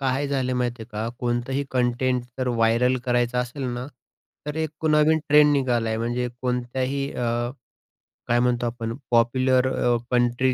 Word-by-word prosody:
काय 135 +1 0
झालं 130 -2 0
माहिती 120 -2 -2
आहे 110 - -12
का. 110 +2 -2
कोणतंही 125 +3 -1
कंटेंट 125 0 +1 0.2
जर 130 -1 0
व्हायरल 120 +2 +2
करायचं 120 0 +1
असेल 125 +3 -3
ना, 125 +2 -5 0.6
तर 150 +1 -4
एक 160 0 -4
नवीन 155 +1 +4
ट्रेंड 150 0 +6
निघाला 125 -5 +1
आहे 110 0 -1
म्हणजे 120 +1 -1
कोणत्याही 130 +3 -2
अ, 120 0 -1 0.8
काय 120 +1 +3
म्हणतो 120 0 +1
आपण. 115 -1 -3 0.2
पॉप्युलर 130 +2 +3
अ, 120 -1 +2
कंट्री 125 +1 +2
125 Hz, 155 wpm, -24 LUFS, 120-130 Hz, 0.8 s, ट्रेंड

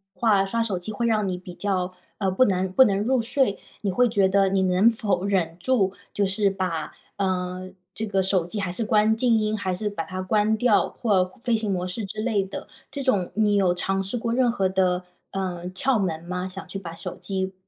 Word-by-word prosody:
话， 205 -4 +3
刷 230 +4 0
手 200 -6 -1
机 180 +5 -6
会 235 +3 -1
让 215 -3 +2
你 185 -1 -2
比 180 0 -10
较， 185 -1 -1 0.2
呃， 195 -2 0
不 225 +8 +4
能 190 -2 0
不 260 +8 +7
能 200 -3 +1
入 255 +2 +2
睡， 240 -2 0 0.2
你 200 - 0
会 245 +6 +3
觉 200 -4 +2
得 195 0 +4
你 190 0 +1
能 185 +4 +4
否 200 -5 -1
忍 175 -5 0
住， 200 -3 +1 0.2
就 205 - +1
是 200 +1 +2
把， 185 -5 -3 0.2
嗯， 185 -1 -2 0.2
这 220 - -3
个 195 -2 +1
手 185 -2 +2
机 175 +5 -5
还 185 -3 -2
是 220 +5 -2
关 215 +1 +3
静 235 -1 +3
音 215 0 0
还 190 -2 -2
是 210 +4 -2
把 185 -5 -4
它 185 0 -5
关 210 +3 +2
掉 225 -2 +3
或 200 -6 +1 0.2
飞 245 -2 +1
行 215 -1 -1
模 180 -1 -2
式 190 +4 -4
之 215 +2 -5
类 220 -3 +1
的， 195 0 -7 0.2
这 280 0 -3
种 200 -9 +1
你 210 -1 +3
有 190 -3 +3
尝 195 +2 -1
试 195 +5 -3
过 230 0 -2
任 250 0 +3
何 195 -5 0
的， 185 -1 +1 0.3
呃， 180 -2 -3
窍 245 +6 +1
门 165 -4 -2
吗？ 180 +1 -3
想 190 +1 -7
去 195 +2 -6
把 165 -3 -8
手 165 - -6
机 190 -1 -3
195 Hz, 240 characters per minute, -24 LUFS, 185-220 Hz, 0.3 s, 不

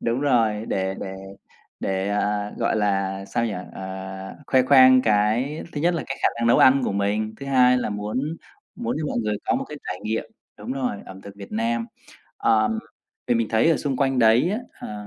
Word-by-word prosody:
đúng 115 +3 -1
rồi, 115 -6 +2
để 95 0 -1
để 95 - -5 0.7
để, 95 0 -1
à, 105 0 -1
gọi 115 -1 +1
là, 95 -2 0
sao 115 +4 -1
nhỉ, 110 - -3 0.2
ờ, 95 0 -7
khoe 130 -1 +4
khoang 130 -1 +7
cái 110 +7 +1
thứ 145 - -4
nhất 175 +3 +2
là 165 - -2
cái 135 - -4
khả - - +5
năng 115 0 -1
nấu 115 - +5
ăn 135 +1 +6
của - - -1
mình, 105 +2 -1
thứ 140 - -6
hai 125 -2 +4
là 125 - -2
muốn 105 +4 -3 0.5
muốn 240 +1 -3
cho 155 - -2
mọi - - -2
người 105 -2 -1
có - - +1
một - - -1
cái 150 - -7
trải 90 - -4
nghiệm 110 +1 -2 0.3
đúng 110 +5 -5
rồi, 130 -5 -2
ẩm 95 0 -10
thực 100 0 -11
Việt 100 -1 -10
Nam. 115 +1 -1 0.5
Ờm, 110 -1 +2 0.5
vì 120 - +2
mình 115 -1 0
thấy 115 +8 +3
ở 160 - +3
xung 140 -3 -2
quanh 135 0 +1
đấy 115 +8 +4
á, 210 - -1 0.3
ờ, 105 -1 -7
110 Hz, 210 wpm, -23 LUFS, 105-130 Hz, 0.7 s, khoang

